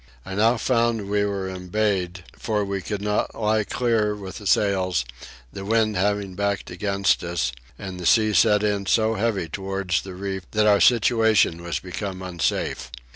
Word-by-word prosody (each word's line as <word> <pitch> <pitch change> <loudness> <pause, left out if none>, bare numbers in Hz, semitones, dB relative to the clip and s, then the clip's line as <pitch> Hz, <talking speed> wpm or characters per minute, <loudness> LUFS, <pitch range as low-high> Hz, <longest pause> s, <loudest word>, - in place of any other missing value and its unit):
I 95 - -6
now 110 +5 +3
found 115 -4 0
we 105 0 +2
were 100 -2 -3
embayed 95 -1 -2
for 105 -2 -1
we 100 -1 -3
could 100 +1 -4
not 105 +2 -1
lie 110 0 +2
clear 110 -2 0
with 95 -2 -8
the 105 - -6
sails, 95 -9 +2 0.5
the 95 - -6
wind 110 +1 +1
having 100 0 0
backed 100 0 -2
against 100 +1 0
us; 85 -8 -1 0.3
and 95 -2 -7
the 90 - -2
sea 110 -2 +4
set 105 -1 +4
in 100 -2 0
so 110 +2 +3
heavy 105 -5 -1
towards 95 +1 -2
the 95 -2 -9
reef 95 0 -5
that 105 0 +3
our 105 -1 +4
situation 110 -7 +4
was 85 -3 -3
become 95 +2 -6
unsafe. 85 -7 -2
100 Hz, 170 wpm, -23 LUFS, 95-105 Hz, 0.5 s, sea